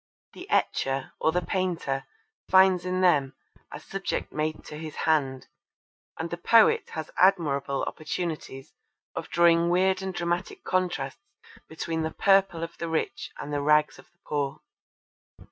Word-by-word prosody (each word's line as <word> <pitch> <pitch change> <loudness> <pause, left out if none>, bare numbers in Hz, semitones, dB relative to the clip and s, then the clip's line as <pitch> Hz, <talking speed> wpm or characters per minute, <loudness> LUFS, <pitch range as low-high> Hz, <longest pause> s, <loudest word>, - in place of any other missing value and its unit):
The - - -11
etcher 135 0 0
or 160 - +2
the 180 +1 0
painter 170 -7 -2 0.4
finds 190 -1 +5
in 185 0 -1
them 140 -7 +3 0.4
'a - - -7
subject 195 +5 -4
made 155 +1 -2
to 150 - -8
his 155 -1 -7
hand,' 135 -5 0 0.7
and 165 +1 -4
the 170 - -3
poet 225 +5 +4
has 160 -1 -5
admirable 145 -8 +2
opportunities 155 -4 -5 0.4
of - - -6
drawing 170 0 +4
weird 185 +2 +2
and 190 0 -3
dramatic 175 0 -3
contrasts 185 -1 -1 0.5
between 160 0 -3
the 160 - -1
purple 195 -1 +3
of 165 - -7
the 170 - -3
rich 160 - -2
and 145 - -5
the 145 - 0
rags 150 +1 +3
of - - -15
the - - -41
poor. 140 -2 -2
165 Hz, 145 wpm, -27 LUFS, 150-185 Hz, 0.7 s, finds